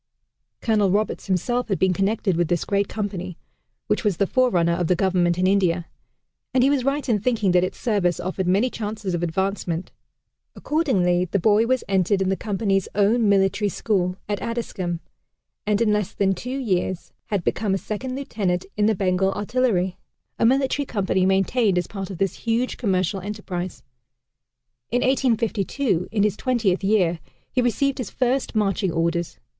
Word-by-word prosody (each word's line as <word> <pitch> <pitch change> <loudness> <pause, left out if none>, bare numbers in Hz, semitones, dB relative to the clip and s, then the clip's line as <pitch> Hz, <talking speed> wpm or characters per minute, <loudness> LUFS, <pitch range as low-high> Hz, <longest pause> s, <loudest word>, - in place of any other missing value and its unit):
Colonel 210 -4 +2
Roberts 210 +3 -1
himself 240 +7 0
had 195 -4 0
been 190 -1 +2
connected 195 0 0
with 170 0 +1
this 175 0 0
great 200 0 +1
company, 190 -4 -4 0.5
which - - 0
was 205 -6 +1
the 200 - +2
forerunner 190 -8 +2
of 175 -1 0
the 180 - +3
Government 175 -2 +1
in 185 - +1
India 185 -3 +2 0.7
and 255 - +5
he 275 - +4
was 275 -3 +1
right 275 +2 -1
in 225 -4 +2
thinking 215 -3 +1
that 180 0 +4
its 185 - -3
service 195 -8 +1
offered 185 0 -3
many 205 +8 +2
chances 210 -3 -4
of 175 - -1
advancement. 175 0 -2 0.6
Accordingly 185 - +1
the 185 - -1
boy 210 +4 +3
was 255 0 +1
entered 190 0 +2
in 190 -1 +1
the 190 - +1
Company's 195 -2 -1
own 210 +2 +3
military 200 +1 +2
school, 185 -3 -1
at 205 -1 -2
Addiscombe; 190 -7 -3 0.7
and 210 -1 +2
in 220 -2 +3
less 210 -2 -1
than 195 -1 +1
two 250 +8 -5
years 185 -7 -2
had 200 -4 -1
become 200 +1 0
a - - +1
second 250 +6 -5
lieutenant 200 -10 -2
in 210 0 +2
the 220 - +2
Bengal 190 0 +1
Artillery 205 -4 0 0.4
a 230 - +4
military 270 +2 +1
company 190 -3 +1
maintained 195 +1 +2
as 180 - +1
part 195 -2 -6
of 190 - -6
this 195 0 -1
huge 235 +2 -1
commercial 190 -3 0
enterprise. 185 -3 -5 1.1
In 245 - +1
1852, 230 - +1
in 210 -3 +1
his 210 -2 +1
twentieth 220 -7 0
year, 185 -5 +2 0.3
he 255 - +1
received 265 +4 0
his 245 - -3
first 255 0 -1
marching 195 -3 +1
orders. 170 +1 -1
200 Hz, 170 wpm, -23 LUFS, 185-230 Hz, 1.1 s, and